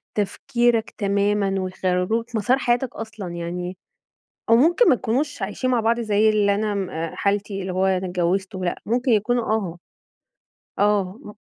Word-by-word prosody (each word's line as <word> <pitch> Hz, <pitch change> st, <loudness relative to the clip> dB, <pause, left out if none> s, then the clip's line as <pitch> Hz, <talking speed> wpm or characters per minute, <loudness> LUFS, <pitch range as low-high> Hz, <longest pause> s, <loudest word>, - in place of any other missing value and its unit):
تفكيرك 235 Hz, +2 st, 0 dB
تمامًا 200 Hz, -1 st, +1 dB
ويغيروا 185 Hz, +3 st, 0 dB
لك 235 Hz, 0 st, -11 dB
مسار 245 Hz, +5 st, +2 dB
حياتك 245 Hz, 0 st, 0 dB
أصلًا 220 Hz, -3 st, -7 dB
يعني، 175 Hz, +1 st, -5 dB, 0.7 s
أو 230 Hz, -, +7 dB
ممكن 340 Hz, -, +5 dB
ما 260 Hz, -, +6 dB
يكونوش 255 Hz, +3 st, -2 dB
عايشين 210 Hz, +6 st, -2 dB
مع 245 Hz, -2 st, +2 dB
بعض 230 Hz, +2 st, +1 dB
زي 215 Hz, -1 st, +3 dB
اللي 205 Hz, -2 st, +3 dB
أنا 205 Hz, -2 st, -1 dB, 0.3 s
حالتي 200 Hz, 0 st, -1 dB
اللي 185 Hz, -1 st, -4 dB
هو 190 Hz, +1 st, +1 dB
أنا 190 Hz, -1 st, +1 dB
اتجوّزت 185 Hz, +3 st, -1 dB
ولأ، 180 Hz, -2 st, -3 dB
ممكن 245 Hz, +3 st, +1 dB
يكونوا 230 Hz, +2 st, +2 dB
آه، 195 Hz, -6 st, -1 dB, 1.0 s
آه 205 Hz, 0 st, +1 dB
مم 210 Hz, -, -10 dB
210 Hz, 150 wpm, -23 LUFS, 190-235 Hz, 1.0 s, أو